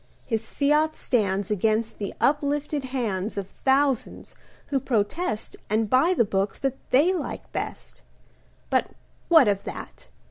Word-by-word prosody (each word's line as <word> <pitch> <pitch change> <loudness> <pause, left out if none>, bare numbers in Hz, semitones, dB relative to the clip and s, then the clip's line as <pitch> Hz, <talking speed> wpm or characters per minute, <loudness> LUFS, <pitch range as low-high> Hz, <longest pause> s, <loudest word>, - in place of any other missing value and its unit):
His 225 -2 -2
fiat 300 +2 +2
stands 200 -4 0
Against 215 +2 0
the 200 - -3
uplifted 290 0 0
hands 220 -6 -2
Of 195 -1 -4
thousands 270 -2 +1 0.4
who 275 - +1
protest 225 - -1
And 215 0 +1
buy 325 +9 +4
the 235 - +3
books 195 0 -1
That 270 -1 -2
they 300 +9 +4
like 365 - -5
best; - - -5 0.7
But - - +2 0.4
what 320 -8 +7
of 200 -1 +1
that? - - -8
250 Hz, 135 wpm, -25 LUFS, 210-285 Hz, 0.7 s, what